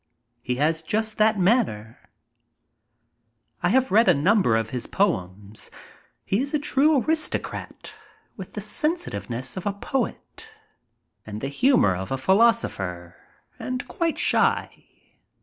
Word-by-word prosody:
He 125 +1 -2
has 160 +4 +1
just 220 +6 -2
that 215 0 +4
manner. 180 - +1 1.6
I 175 - +2
have 260 +5 +2
read 220 +3 +5
a 180 - +6
number 170 - +3
of 115 0 -1
his 125 -2 -4
poems. 100 - -2 0.6
He 200 +5 +1
is 280 +2 -2
a - - +4
true 290 0 +3
aristocrat 315 0 -2 0.4
with - - -9
the - - -5
sensitiveness 300 - -3
of 185 - -4
a 200 - 0
poet 270 - -4 0.7
and 105 0 -7
the 135 - -3
humor 140 - +3
of 95 +5 -6
a 135 - 0
philoso 225 - +4
pher, 90 -3 -6 0.5
and 255 0 -4
quite 335 -2 -1
shy. - - +1
190 Hz, 130 wpm, -24 LUFS, -, 1.6 s, a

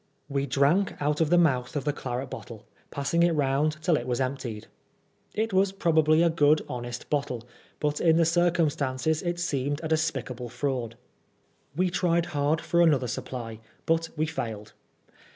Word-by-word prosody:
We 140 -1 -1
drank 145 +9 +2
out 150 +2 0
of 160 - +2
the 175 - +5
mouth 135 -5 +2
of 145 - -1
the 145 - +1
claret 130 -1 -4
bottle, 110 -3 -9 0.2
passing 140 +4 0
it 170 0 +4
round 150 +1 +1
till 175 -2 +3
it 120 - -5
was 125 0 -1
emptied. 130 -5 -3 0.7
It 220 0 -1
was 190 +1 +3
probably 160 -4 +3
a 170 - +4
good 155 -1 +3
honest 120 0 -6
bottle, 140 -5 -1 0.4
but 150 0 -1
in 165 -1 +4
the 165 - +4
circumstances 160 -4 +1
it 175 -1 -2
seemed 145 -3 -1
a - - -1
despicable 135 -6 -2
fraud. 125 -4 -3 0.8
We 180 +2 +1
tried 170 -1 +1
hard 145 +3 +1
for 170 -1 +2
another 150 -7 +4
supply, 115 -1 -5 0.3
but 165 0 +1
we 155 - +1
failed. 110 -8 -5
150 Hz, 165 wpm, -27 LUFS, 130-165 Hz, 0.8 s, the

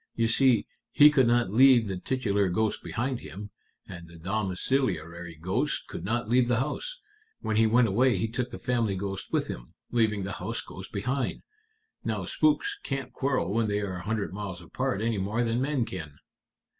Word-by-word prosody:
You 115 -1 +2
see, 120 -2 +4 0.2
he 150 0 +7
could 130 -5 +4
not 120 -5 +2
leave 125 -1 +6
the 95 - -2
titular 100 -2 0
ghost 110 +4 0
behind 120 +9 -2
him, 100 +2 -9 0.4
and 85 -3 -9
the 85 0 -13
domiciliary 90 - -2
ghost 90 +3 -1
could - - -7
not 115 +4 -1
leave 120 +1 +3
the 120 -1 +2
house. - - -3 0.4
When 110 - -1
he 110 +1 +5
went 115 +2 +4
away 120 +2 +3
he 115 - 0
took 120 +2 -2
the - - -7
family 120 -5 0
ghost 95 0 -4
with - - +1
him, - - -8 0.2
leaving 110 -4 +2
the 95 - -4
house - - -2
ghost - - -10
behind. 125 +5 -2 0.6
Now - - -2
spooks 405 +7 +1
can't 135 -2 -4
quarrel 130 -9 0
when 115 0 +2
they 105 0 0
are 95 -3 -3
a - - -6
hundred 105 -1 -2
miles 100 -3 -5
apart 110 +5 -2
any 115 -3 0
more 105 +5 0
than 115 +1 0
men 135 -3 0
can." 80 -8 -7
110 Hz, 185 wpm, -28 LUFS, 95-125 Hz, 0.6 s, he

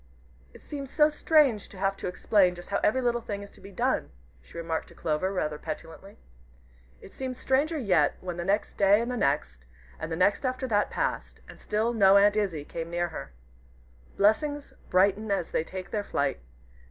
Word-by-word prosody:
"It - - -16
seems 280 -3 -6
so 300 +1 +4
strange 295 -8 +3
to 195 - -13
have 195 +1 0
to - - -5
explain 180 0 +2
just 175 +3 -11
how - - +1
every 260 +4 +2
little 240 -1 +1
thing 200 -3 -5
is 200 - -12
to - - -18
be 195 - -11
done," 185 - 0 0.3
she - - -14
remarked 165 -1 -3
to - - -17
Clover, 160 +4 -1
rather 150 -6 -2
petulantly. 165 +5 -8 0.8
It - - -13
seemed 260 -1 -5
stranger 290 +6 +1
yet, 180 - +2
when 180 -2 -6
the 175 - -3
next 200 +4 -1
day, 200 +1 +5
and 235 +2 -2
the - - -2
next, 140 - -1 0.3
and 160 +1 -5
the - - -1
next 190 - +2
after 255 0 -2
that 205 -2 +2
passed, - - -3
and - - -13
still 220 +3 -1
no 200 -3 +6
Aunt 205 +1 +5
Izzie 185 -9 -1
came 165 +1 -6
near 175 0 -1
her. 160 - -8 0.9
Blessings 290 +8 +1 0.2
brighten 200 +3 +2
as 195 -4 -1
they - - 0
take 185 +2 -8
their 210 -2 -1
flight. 140 - -1
200 Hz, 195 wpm, -27 LUFS, 175-235 Hz, 0.9 s, no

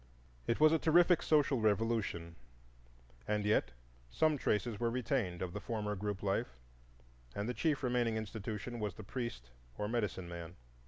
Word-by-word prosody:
It 115 - +1
was 155 0 +7
a 160 - +3
terrific 170 +2 +5
social 145 -4 +3
revolution, 105 -6 0 0.9
and 105 -1 0
yet 105 - +3 0.4
some 155 - +2
traces 110 -4 0
were 120 - +1
retained 115 - -1
of 90 -1 -4
the - - -3
former 105 -2 -2
group 105 0 -3
life, 95 -11 -1 0.8
and 100 +1 -2
the 125 - -1
chief 150 0 0
remaining 120 -3 +1
institution 110 +2 -5
was 105 -3 -2
the 110 - -9
Priest 100 - -5 0.3
or 105 - -1
Medicine 105 -5 -2
man. 85 0 -7
110 Hz, 155 wpm, -35 LUFS, 100-125 Hz, 0.9 s, was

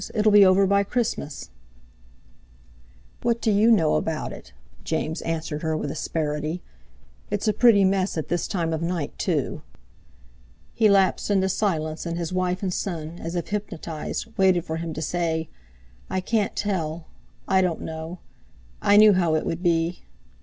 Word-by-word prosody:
It'll 215 0 +3
be 205 -1 +8
over 190 +1 +5
by 200 +1 +3
Christmas." 200 - -3 1.7
"What 235 -1 +1
do 225 - +1
you 210 +3 +4
know 180 -9 +4
about 160 -1 -3
it?" - - -12 0.3
James 160 +2 -2
answered 160 -2 -3
her 160 -1 -1
with 145 - -3
asperity. 155 +2 -3 0.7
"It's 205 +2 -2
a 215 - +3
pretty 210 -2 +5
mess 190 -1 +1
at 155 - -3
this 175 - -1
time 170 -5 -1
of 160 - -2
night, 170 -3 -3
too!" - - -1 1.1
He 220 -2 +4
lapsed 195 0 +3
into 190 -2 +2
silence, 160 -5 -1
and 170 0 -3
his 170 0 -3
wife 185 +1 -1
and 185 -2 -1
son, 170 -3 -4
as 165 +2 -5
if 175 - -3
hypnotised, 170 -6 -4
waited 185 -3 +3
for 160 -1 -3
him 165 0 -4
to 155 - -3
say: 160 -1 -1 0.6
"I 190 - -1
can't 205 +2 -1
tell—I 175 0 -2
don't 180 -3 -1
know; 160 +2 -6 0.6
I 205 0 +5
knew 210 0 +8
how 170 -4 +2
it 155 - -1
would 165 +1 -3
be!" 170 -1 +1
175 Hz, 160 wpm, -24 LUFS, 160-200 Hz, 1.7 s, be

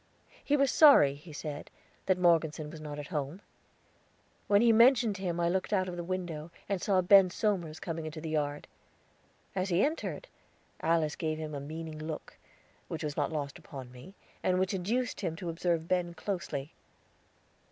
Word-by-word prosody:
He 290 - +2
was 275 -1 +3
sorry, 280 - +7
he 150 +4 -13
said, 150 -1 -6 0.4
that 190 - +3
Morgeson 160 -4 +2
was 160 -1 -9
not 150 -1 -6
at 145 -1 -7
home. 150 +1 -3 1.1
When 205 +2 +5
he 235 - +6
mentioned 230 -2 +5
him 175 -3 -2
I 170 - +2
looked 185 +4 -1
out 185 -2 +2
of 180 - -5
the 175 - -4
window, 170 -3 -4 0.2
and 195 -3 -1
saw 190 -2 +3
Ben 190 +1 +7
Somers 175 -5 -1
coming 165 -2 -4
into 155 +1 -6
the 160 0 -5
yard. 145 -1 -2 0.9
As 190 0 -1
he 180 +5 +3
entered, 310 +3 -3 0.5
Alice 160 -2 +1
gave 155 -1 -2
him 155 -1 -5
a 145 - -3
meaning 155 +2 -7
look, 155 0 -6 0.5
which 160 -1 -5
was 150 -2 -3
not 145 -1 0
lost 145 -3 -4
upon 130 -3 -9
me, 130 +10 -13 0.3
and 185 0 +2
which 185 +1 +1
induced 225 +7 -1
him 170 -5 -2
to 170 +1 -5
observe 165 -1 -1
Ben 175 -1 0
closely. 155 -8 -4
170 Hz, 175 wpm, -31 LUFS, 155-190 Hz, 1.1 s, sorry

